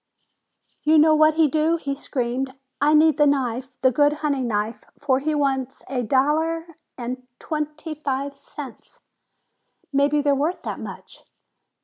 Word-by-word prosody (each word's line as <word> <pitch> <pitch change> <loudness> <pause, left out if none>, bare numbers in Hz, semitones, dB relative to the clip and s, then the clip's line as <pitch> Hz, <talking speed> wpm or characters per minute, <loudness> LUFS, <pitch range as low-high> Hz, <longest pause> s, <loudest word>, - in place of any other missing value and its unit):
"You 310 +1 +4
know 310 +1 +6
what 310 0 +5
he 320 -1 +5
do?" 315 +3 +2
he 280 -4 -3
screamed. 260 -1 -3 0.3
"I 300 +1 +4
need 310 -1 +5
the 295 - +6
knife, 260 -2 -1
the 260 - +4
good 290 +4 +3
hunting 275 -4 0
knife! 215 0 -2
For 270 -2 +1
it 275 - -12
he 310 -1 +1
wants 270 -2 -1
a 260 -2 -2
doll 270 +6 +2
air 330 0 -4 0.2
and 250 +1 -5
twenty 305 +1 -4
five 280 -2 -3
cents!" 275 -3 -11 0.9
"Maybe 285 +2 +3
they're 285 -1 +3
worth 320 +6 -1
that - - -4
much." - - -10
285 Hz, 155 wpm, -23 LUFS, 260-310 Hz, 0.9 s, know